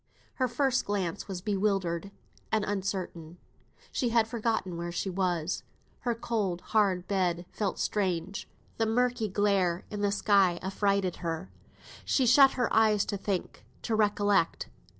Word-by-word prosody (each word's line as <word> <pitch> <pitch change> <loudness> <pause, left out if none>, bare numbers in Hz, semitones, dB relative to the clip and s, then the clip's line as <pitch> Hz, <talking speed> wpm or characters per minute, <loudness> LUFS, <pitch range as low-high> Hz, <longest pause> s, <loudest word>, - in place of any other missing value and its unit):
Her 255 - +2
first 260 +1 +1
glance 195 -3 -2
was 190 -3 -5
bewildered 195 -3 0 0.4
and 215 -1 +1
uncertain. 185 -4 -4 0.5
She 245 - 0
had 230 -1 +3
forgotten 220 -6 -1
where 170 0 -4
she 185 +2 -2
was. 180 -2 -1 0.4
Her 240 -1 -1
cold, 210 -7 -2
hard 195 -5 +1
bed 180 -3 0
felt 205 -3 -2
strange; 190 -2 -2 0.3
the 225 - +1
murky 245 0 +1
glare 190 -3 +1
in 210 -1 -4
the 205 -1 +2
sky 200 -3 +3
affrighted 195 -1 0
her. 165 +1 -4 0.5
She 265 - +2
shut 270 +3 +7
her 245 -2 -1
eyes 215 -2 +4
to - - -3
think, 195 -2 -3 0.2
to 230 - -2
recollect. 205 -4 +2
200 Hz, 140 wpm, -29 LUFS, 180-220 Hz, 0.5 s, shut